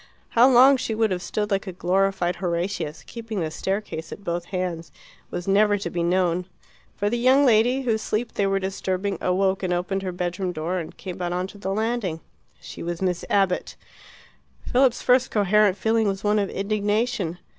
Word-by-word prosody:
How 240 +3 +5
long 265 +2 +7
she 225 -3 -3
would 220 -2 +1
have 180 -1 -1
stood 210 +2 -3
like 195 +1 0
a - - -3
glorified 180 0 0
Horatius, 170 -3 -3
keeping 225 -3 -6
the 160 -2 -2
staircase 190 -2 -4
at 200 - -9
both 170 -2 -3
ends, 180 -3 -3 0.4
was 175 - -5
never 205 +1 +4
to 200 - -5
be 175 - -2
known. 175 0 +1 0.5
For 205 - -1
the 235 +3 0
young 260 +4 +5
lady, 245 +2 +4
whose 225 -3 0
sleep 225 +2 -2
they 200 - +1
were 195 0 +1
disturbing, 190 0 -2
awoke 190 +1 +1
and 185 -2 -2
opened 180 +2 -1
her 190 -1 -3
bedroom 180 +1 -3
door, 170 +3 -2
and 165 - -8
came 185 -1 -7
out 175 0 -1
on 180 +1 -1
to 205 +2 -11
the 195 -1 -3
landing. 215 -5 -1 0.4
She - - -10
was 170 0 -4
Miss 180 -2 -1
Abbott. 195 -2 +1 0.9
Philip's 255 -1 +2
first 250 0 +4
coherent 205 -1 +3
feeling 225 +1 +1
was 195 -1 -2
one 210 0 +2
of 200 -2 -1
indignation. 205 -2 -1
195 Hz, 190 wpm, -24 LUFS, 180-215 Hz, 0.9 s, long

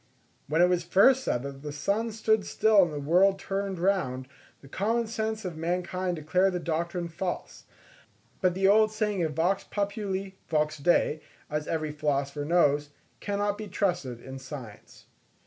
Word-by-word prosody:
When 160 +4 +3
it - - +6
was 180 -1 +1
first 245 +10 +5
said 120 - -1
that 140 -1 -7
the 150 0 -5
sun 200 +10 -1
stood 220 -1 +1
still 215 0 +4
and 175 -3 +2
the 150 - -4
world 180 +7 +4
turned 195 -1 -3
round, 170 -9 0 0.3
the 135 - -14
common 225 - 0
sense 220 -1 -3
of 175 -3 -4
mankind 180 +2 -2
declared 180 +5 +1
the 180 - -1
doctrine 170 +1 -2
false; 175 +2 -5 0.8
but 180 -2 +2
the 190 +1 +3
old 215 +2 +5
saying 210 -3 -1
of 160 -2 -1
Vox 180 +5 +1
populi, 200 -1 -3 0.2
vox 155 -1 0
Dei, 155 0 +2 0.3
as 150 0 -2
every 155 -2 -2
philosopher 145 -1 -1
knows, 145 -3 +3 0.3
cannot 205 0 -1
be 215 - -5
trusted 170 - -1
in 130 +2 -9
science. 130 -6 -10
180 Hz, 165 wpm, -28 LUFS, 150-200 Hz, 0.8 s, it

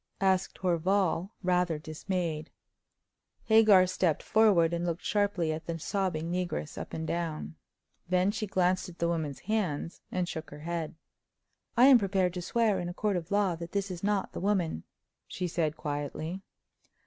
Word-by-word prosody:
asked 190 -1 +1
Horval, 180 0 +1
rather 180 -3 +2
dismayed. 155 0 -3 0.9
Hagar 215 -4 +6
stepped 180 -3 0
forward, 195 -7 +4
and 170 0 -1
looked 170 0 -2
sharply 200 -6 +1
at 160 +1 -7
the 170 -1 -2
sobbing 170 -2 -2
negress 180 -4 -3
up - - -6
and 160 - -4
down. 165 -1 -3 0.6
Then 185 +2 +3
she 215 0 -3
glanced 185 0 +1
at 175 - -13
the 170 - 0
woman's 155 -6 -2
hands 185 -6 -2
and 180 -1 -1
shook 160 -2 -6
her 145 +1 -10
head. 165 -1 -3 0.8
"I 245 - +8
am 265 -3 +8
prepared 190 -3 +1
to 180 - -4
swear 215 +1 +1
in 175 -1 -3
a 175 - -7
court 210 -1 0
of 170 -1 -3
law 200 -3 +2
that 170 0 -8
this 200 -1 -1
is 175 0 -7
not 205 -1 0
the - - -4
woman," 180 - 0 0.4
she 180 - -3
said, 160 -2 -1
quietly. 150 +5 -4
180 Hz, 165 wpm, -30 LUFS, 165-195 Hz, 0.9 s, I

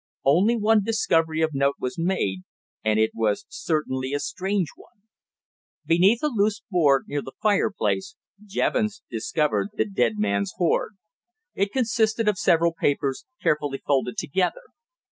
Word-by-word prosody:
Only 190 - +4
one 220 0 +3
discovery 165 -7 +1
of 160 -1 0
note 140 0 +1
was 130 +7 -4
made, 165 - 0 0.4
and 110 0 +2
it 110 0 +2
was 110 -2 0
certainly 135 -4 -2
a 145 - 0
strange 190 - -2
one. 200 - -21 0.8
Beneath 190 - +3
a - - +3
loose 215 -6 0
board, 145 -7 +3
near 145 0 -2
the 135 - -10
fireplace, 205 - 0 0.3
Jevons 215 +1 -1
discovered 150 - 0
the - - 0
dead 120 - 0
man's 100 -1 0
hoard. 180 +2 0 0.6
It 200 +1 -1
consisted 225 -3 +1
of 205 -3 +2
several 170 -1 +3
papers 140 -4 -1 0.2
carefully 145 -2 0
folded 135 -3 0
together. 190 - -1
170 Hz, 140 wpm, -24 LUFS, 140-205 Hz, 0.8 s, Only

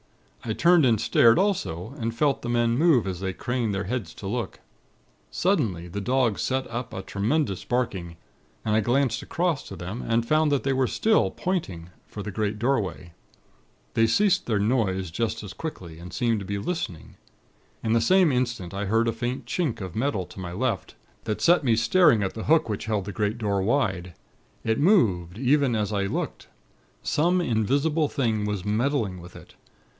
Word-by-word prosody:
I 110 - -2
turned 170 +5 +4
and 115 -3 +3
stared, 115 +2 +5
also, 135 - -1
and 115 0 -2
felt 140 +2 +1
the 120 - -4
men 120 -1 +2
move 150 -5 +4
as 95 -2 -4
they 95 0 -3
craned 120 -1 -2
their 95 - -1
heads 105 -4 -4
to - - -9
look. 115 +4 -3 0.7
Suddenly, 115 - 0
the 100 +4 -4
dogs 125 -1 +1
set 130 0 -1
up 120 +1 -4
a 95 - -6
tremendous 100 - -1
barking, 95 -9 -2 0.5
and 105 -1 +1
I 110 - +4
glanced 120 +1 +1
across 170 -4 -1
to 95 - -8
them, 90 +7 -6
and 115 0 0
found 155 +1 +3
they 135 -1 +1
were 130 -1 +2
still 220 - +2
'pointing' 95 - -3 0.2
for 105 - -7
the 105 - -5
big 105 +1 -2
doorway. 105 -8 -1 0.8
They 115 0 +3
ceased 195 - +2
their 110 -3 +1
noise 100 -5 0
just 110 +4 -2
as 100 - -8
quickly, 85 - -7
and 90 +1 -9
seemed 115 -3 0
to 100 - -7
be 100 +1 -3
listening. 100 - -5 0.7
In 110 - +1
the 115 - +3
same 185 +5 +4
instant, 120 -8 -2
I 100 +1 -3
heard 115 +3 +2
a 115 - +1
faint 120 +3 -4
chink 160 -10 -1
of 95 -4 -7
metal 115 -5 -1
to - - -12
my 90 -2 -5
left, 95 -4 -2 0.3
that 105 - -2
set 175 -1 +4
me 120 -4 +3
staring 115 - +4
at 95 - -2
the 110 - -6
hook 160 0 +4
which 105 -3 -3
held 105 -3 -1
the 100 - -5
great 105 +3 -1
door 100 -4 0
wide. 95 - 0 0.5
It 110 0 0
moved, 105 - +3
even 135 0 +2
as 105 -1 -1
I 100 -1 0
looked. - - -4 0.6
Some 175 +4 +2
invisible 145 +5 +1
thing 110 -7 -1
was 105 -3 -3
meddling 105 -4 0
with 90 +1 -13
it. - - -13
115 Hz, 185 wpm, -25 LUFS, 100-135 Hz, 0.8 s, stared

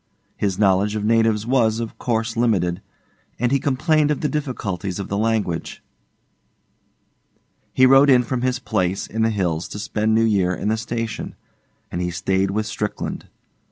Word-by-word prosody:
His 100 -3 -1
knowledge 100 +1 +2
of 105 -1 -2
natives 115 -1 +2
was, 115 -3 +2
of 115 -2 -5
course, 115 -1 -1
limited, 95 -7 +1 0.6
and 120 +1 0
he 140 - +3
complained 150 +3 +1
of 150 - -1
the 150 - 0
difficulties 100 - -3
of 100 - -5
the 100 - -2
language. 105 -7 -1 1.9
He 130 - +4
rode 135 +2 +6
in 125 -2 +6
from 125 +1 -3
his 130 0 0
place 100 -6 -1
in 110 - -4
the 110 - +3
hills 90 -6 -1
to - - -8
spend 105 +1 0
New 115 0 +4
Year 95 -5 +2
in 105 - -2
the 110 - +1
station, 115 0 -4 0.6
and 85 - -3
he 90 - -1
stayed 95 +2 0
with 105 +2 -1
Strickland. 105 -1 -4
110 Hz, 165 wpm, -21 LUFS, 95-120 Hz, 1.9 s, rode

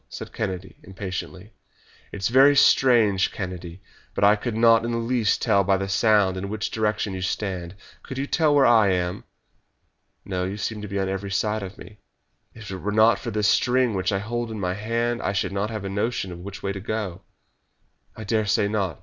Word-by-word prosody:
said - - -8
Kennedy 95 -4 -5
impatiently. 95 +1 -7 0.6
"It's 100 +1 -2
very 135 +4 +6
strange, 115 -9 +4
Kennedy, 90 -1 -7 0.3
but - - -1
I 105 +1 +6
could 110 +2 -4
not 115 0 +5
in 115 - -2
the 115 - -1
least 115 -2 0
tell 100 -4 +3
by 95 0 +2
the 95 0 -3
sound 100 -2 +3
in 100 +1 -4
which 110 +1 -3
direction 105 -2 -1
you 95 - -5
stand. 90 -2 -3 0.3
Could 130 - -8
you 135 - -1
tell 150 0 +2
where 140 -2 +5
I 115 -3 +5
am?" 90 -1 -1 1.0
"No; 90 -2 -2
you 95 +2 -4
seem 105 0 -4
to 105 - -6
be 100 0 -4
on 95 -1 0
every 95 +1 -4
side 105 +2 -1
of 95 0 -8
me." 105 0 -13 0.6
"If 110 -4 -9
it 95 - -4
were 100 +3 -3
not 110 +2 +4
for 120 - -5
this 105 -1 0
string 125 0 +2
which 95 -1 -1
I 100 - +1
hold 120 +3 -3
in 110 -1 -6
my 90 -2 -1
hand 115 +3 -2
I 100 - -1
should 95 -1 -1
not 100 +2 -2
have 110 -3 -5
a - - -3
notion 95 -4 -3
which 100 0 -9
way 100 - -1
to 100 - -5
go." 105 -4 -4 0.9
"I 110 - -8
dare 110 0 0
say 100 0 +2
not. 100 -7 -2
105 Hz, 210 wpm, -24 LUFS, 95-115 Hz, 1.0 s, very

